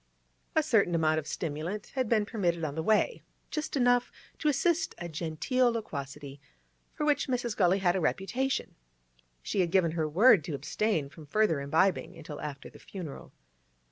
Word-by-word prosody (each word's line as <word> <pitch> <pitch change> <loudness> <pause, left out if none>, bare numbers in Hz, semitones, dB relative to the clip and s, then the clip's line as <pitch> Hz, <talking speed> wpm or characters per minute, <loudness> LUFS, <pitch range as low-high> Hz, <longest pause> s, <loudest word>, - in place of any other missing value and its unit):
A - - +4
certain 175 - +3
amount 155 -1 +2
of 155 - -8
stimulant 165 +6 -4
had 255 -4 -1
been 215 -3 +3
permitted 175 -7 -1
on 150 -3 -2
the 160 - -2
way, 220 - +2 0.3
just 305 -2 -2
enough 245 -1 +3 0.3
to 305 - -1
assist 325 +4 +1
a 175 - -5
genteel 170 - 0
loquacity, 145 -9 -6 0.5
for 300 - -1
which 295 -1 +2
Mrs. 245 -4 -1
Gully 185 -1 +3
had 180 -2 +2
a 190 - 0
reputation. 255 +11 -1 0.7
She - - -2
had 175 -2 +2
given 175 -2 +3
her 160 -2 -1
word 195 - +6
to 160 - -3
abstain 155 +3 -1
from 150 +1 -13
further 205 -5 +2
imbibing 160 +7 +1
until 155 -2 -8
after 145 -2 -6
the - - -14
funeral. 175 -8 -8
180 Hz, 170 wpm, -29 LUFS, 155-235 Hz, 0.7 s, word